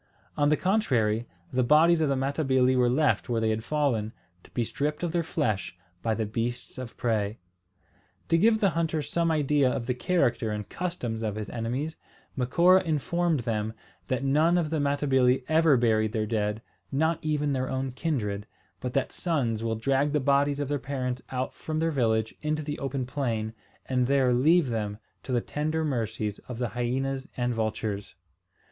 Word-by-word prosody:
On 145 Hz, 0 st, +3 dB
the 150 Hz, -, +3 dB
contrary, 120 Hz, -, +1 dB, 0.3 s
the 130 Hz, -, +2 dB
bodies 160 Hz, +6 st, +5 dB
of 155 Hz, -, +2 dB
the 140 Hz, -, +2 dB
Matabili 130 Hz, -1 st, +2 dB
were 125 Hz, -1 st, +3 dB
left 145 Hz, +1 st, +2 dB
where 115 Hz, -2 st, +1 dB
they 110 Hz, -1 st, +1 dB
had 110 Hz, 0 st, -2 dB
fallen, 120 Hz, -6 st, 0 dB, 0.3 s
to -, -, -17 dB
be 120 Hz, -, -1 dB
stripped 150 Hz, +7 st, -2 dB
of 170 Hz, -, 0 dB
their 170 Hz, -, +1 dB
flesh 105 Hz, -, -2 dB, 0.2 s
by 110 Hz, -1 st, 0 dB
the 110 Hz, -, -1 dB
beasts 115 Hz, +4 st, -4 dB
of 125 Hz, -3 st, -7 dB
prey. 110 Hz, -2 st, 0 dB, 0.9 s
To 165 Hz, -, +4 dB
give 220 Hz, +4 st, +5 dB
the 200 Hz, -3 st, +2 dB
hunters 160 Hz, -3 st, -1 dB
some 170 Hz, -1 st, +1 dB
idea 145 Hz, -3 st, +3 dB
of 120 Hz, -, -2 dB
the 125 Hz, -, 0 dB
character 125 Hz, -, +1 dB
and 105 Hz, -1 st, -4 dB
customs 145 Hz, -11 st, -3 dB
of 110 Hz, -2 st, -2 dB
his 105 Hz, -1 st, -5 dB
enemies, 125 Hz, +7 st, -3 dB, 0.4 s
Macora 170 Hz, +9 st, +4 dB
informed 165 Hz, 0 st, 0 dB
them 110 Hz, -2 st, -2 dB, 0.3 s
that 130 Hz, +4 st, -1 dB
none 155 Hz, +6 st, +3 dB
of 160 Hz, -3 st, 0 dB
the 160 Hz, -, 0 dB
Matabili 135 Hz, -3 st, +2 dB
ever 160 Hz, -2 st, +4 dB
buried 110 Hz, -2 st, +2 dB
their 110 Hz, -2 st, 0 dB
dead, 105 Hz, 0 st, -1 dB, 0.3 s
not 160 Hz, +4 st, +1 dB
even 150 Hz, -2 st, 0 dB
their 130 Hz, -1 st, -1 dB
own 130 Hz, 0 st, -2 dB
kindred; 110 Hz, -8 st, -2 dB, 0.3 s
but 125 Hz, -1 st, -4 dB
that 135 Hz, -, 0 dB
sons 125 Hz, -10 st, -1 dB
will 115 Hz, -1 st, 0 dB
drag 135 Hz, +5 st, +1 dB
the 150 Hz, -, +3 dB
bodies 140 Hz, +1 st, +2 dB
of 145 Hz, -, -1 dB
their 145 Hz, 0 st, -1 dB
parents 125 Hz, -2 st, -3 dB
out 130 Hz, 0 st, -2 dB
from 155 Hz, -1 st, -4 dB
their 165 Hz, +1 st, +1 dB
village 110 Hz, -5 st, +1 dB
into 155 Hz, 0 st, -1 dB
the 145 Hz, 0 st, -4 dB
open 135 Hz, -2 st, -2 dB
plain, 115 Hz, -5 st, -2 dB, 0.3 s
and 125 Hz, -1 st, +1 dB
there 135 Hz, -2 st, +3 dB
leave 150 Hz, +4 st, +4 dB
them 105 Hz, -3 st, -2 dB, 0.2 s
to 130 Hz, -, -7 dB
the 120 Hz, -1 st, +2 dB
tender 155 Hz, +4 st, -2 dB
mercies 110 Hz, -6 st, -2 dB
of 125 Hz, -, -6 dB
the 120 Hz, -1 st, -1 dB
hyenas 130 Hz, +3 st, -2 dB
and 125 Hz, -1 st, 0 dB
vultures. 110 Hz, -3 st, -3 dB
130 Hz, 180 wpm, -27 LUFS, 115-150 Hz, 0.9 s, bodies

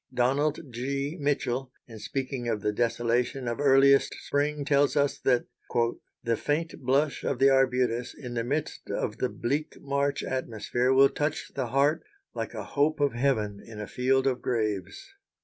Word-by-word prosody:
Donald 135 Hz, +4 st, +1 dB
G. 140 Hz, +5 st, -2 dB
Mitchell, 135 Hz, -3 st, -1 dB, 0.2 s
in 115 Hz, -2 st, -10 dB
speaking 130 Hz, 0 st, -3 dB
of 110 Hz, -3 st, -1 dB
the 105 Hz, -, 0 dB
desolation 120 Hz, +3 st, 0 dB
of 120 Hz, +2 st, -2 dB
earliest 140 Hz, -1 st, +5 dB
spring, 145 Hz, 0 st, -1 dB
tells 145 Hz, 0 st, +3 dB
us 145 Hz, -1 st, +1 dB
that 125 Hz, -2 st, +2 dB, 0.8 s
"the 115 Hz, -1 st, +1 dB
faint 155 Hz, +7 st, -2 dB
blush 140 Hz, +3 st, +1 dB
of 135 Hz, -, -1 dB
the 135 Hz, +2 st, +5 dB
arbutus, 125 Hz, -2 st, +1 dB
in 125 Hz, -3 st, -7 dB
the 115 Hz, -1 st, -1 dB
midst 145 Hz, +5 st, -3 dB
of -, -, -2 dB
the -, -, 0 dB
bleak 145 Hz, +6 st, -2 dB
March 140 Hz, 0 st, -1 dB
atmosphere 125 Hz, 0 st, -1 dB
will 135 Hz, +1 st, +6 dB
touch 150 Hz, +1 st, -2 dB
the 130 Hz, -3 st, -2 dB
heart 140 Hz, +5 st, +2 dB, 0.3 s
like -, -, -5 dB
a -, -, -4 dB
hope 150 Hz, +2 st, 0 dB
of 145 Hz, -1 st, +2 dB
heaven, 110 Hz, -6 st, 0 dB
in 110 Hz, -2 st, -10 dB
a 105 Hz, -, -4 dB
field 130 Hz, +5 st, +1 dB
of 130 Hz, -2 st, 0 dB
graves." 110 Hz, -, -2 dB
135 Hz, 165 wpm, -28 LUFS, 120-140 Hz, 0.8 s, will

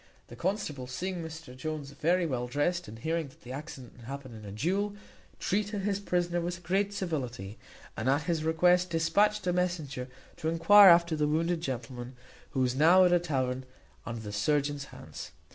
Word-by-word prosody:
The 120 Hz, -, -9 dB
constable, 150 Hz, -, -2 dB
seeing 180 Hz, +9 st, -3 dB
Mr 160 Hz, -5 st, -8 dB
Jones 145 Hz, +1 st, -5 dB
very 170 Hz, +5 st, +1 dB
well 125 Hz, -5 st, -2 dB
drest, 170 Hz, +7 st, 0 dB
and 110 Hz, -, -9 dB
hearing 160 Hz, +5 st, -1 dB
that 130 Hz, -, -19 dB
the 125 Hz, -, -10 dB
accident 135 Hz, -3 st, -8 dB
had 120 Hz, -, -13 dB
happened 135 Hz, -1 st, -7 dB
in 110 Hz, -1 st, -10 dB
a 100 Hz, -, -7 dB
duel, 195 Hz, -, -1 dB, 0.4 s
treated 210 Hz, 0 st, -1 dB
his 200 Hz, 0 st, 0 dB
prisoner 175 Hz, -3 st, 0 dB
with 175 Hz, +1 st, -4 dB
great 195 Hz, +3 st, +1 dB
civility, 125 Hz, -, -4 dB, 0.4 s
and 115 Hz, +4 st, -1 dB
at 140 Hz, +3 st, +2 dB
his 165 Hz, -1 st, -1 dB
request 180 Hz, +3 st, +3 dB
dispatched 200 Hz, +5 st, +2 dB
a 180 Hz, -, +1 dB
messenger 160 Hz, -8 st, -2 dB, 0.3 s
to 160 Hz, -2 st, -1 dB
enquire 190 Hz, +5 st, +8 dB
after 170 Hz, -1 st, +5 dB
the 150 Hz, -1 st, +1 dB
wounded 165 Hz, +2 st, 0 dB
gentleman, 125 Hz, -2 st, -5 dB, 0.3 s
who 130 Hz, -, -1 dB
was 125 Hz, -1 st, +2 dB
now 170 Hz, +6 st, +6 dB
at 180 Hz, -, +4 dB
a 175 Hz, -, +5 dB
tavern 130 Hz, -6 st, -1 dB, 0.4 s
under 115 Hz, -1 st, -5 dB
the 105 Hz, -1 st, -6 dB
surgeon's 145 Hz, +5 st, 0 dB
hands. 80 Hz, -, -10 dB
160 Hz, 180 wpm, -30 LUFS, 130-180 Hz, 0.4 s, enquire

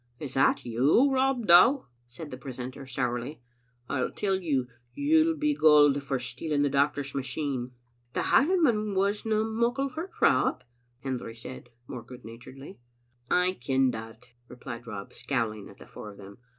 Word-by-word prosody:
" 120 Hz, -, -38 dB
Is 130 Hz, -, -9 dB
that 135 Hz, -, +2 dB
you, 140 Hz, -, +3 dB
Rob 265 Hz, -3 st, +1 dB
Dow?" 180 Hz, +11 st, +6 dB, 0.2 s
said 145 Hz, +6 st, -10 dB
the 130 Hz, -, -6 dB
precentor 130 Hz, +1 st, -7 dB
sourly. 125 Hz, +3 st, -3 dB, 0.3 s
" 125 Hz, -1 st, -41 dB
I 130 Hz, -, -1 dB
tell 195 Hz, -2 st, -1 dB
you, 150 Hz, -9 st, -1 dB, 0.3 s
you'll 320 Hz, +2 st, +3 dB
be 300 Hz, 0 st, +1 dB
gaoled 145 Hz, -, +5 dB
for 140 Hz, -1 st, -2 dB
stealing 145 Hz, +4 st, -2 dB
the 145 Hz, -, +1 dB
doctor's 140 Hz, 0 st, 0 dB
machine." 130 Hz, -2 st, -3 dB, 0.2 s
" 120 Hz, 0 st, -40 dB
The -, -, +1 dB
Hielandman 265 Hz, -, +2 dB
wasna 210 Hz, +3 st, +1 dB
muckle 235 Hz, +5 st, 0 dB
hurt, 325 Hz, +8 st, -7 dB
Rob," -, -, +2 dB, 0.4 s
Hendry 125 Hz, -4 st, -4 dB
said, 120 Hz, +1 st, -10 dB, 0.2 s
more 125 Hz, -1 st, -7 dB
good 125 Hz, +1 st, -13 dB
naturedly. 130 Hz, -, -11 dB, 0.5 s
"I 180 Hz, +3 st, +3 dB
ken 130 Hz, +1 st, +2 dB
that," 115 Hz, +2 st, -9 dB, 0.2 s
replied 125 Hz, -1 st, -9 dB
Rob, 100 Hz, -3 st, -7 dB
scowling 110 Hz, -6 st, -3 dB
at -, -, -15 dB
the -, -, -13 dB
four 105 Hz, -, -10 dB
of 100 Hz, -, -13 dB
them. 100 Hz, +1 st, -13 dB
140 Hz, 165 wpm, -28 LUFS, 125-205 Hz, 0.5 s, Dow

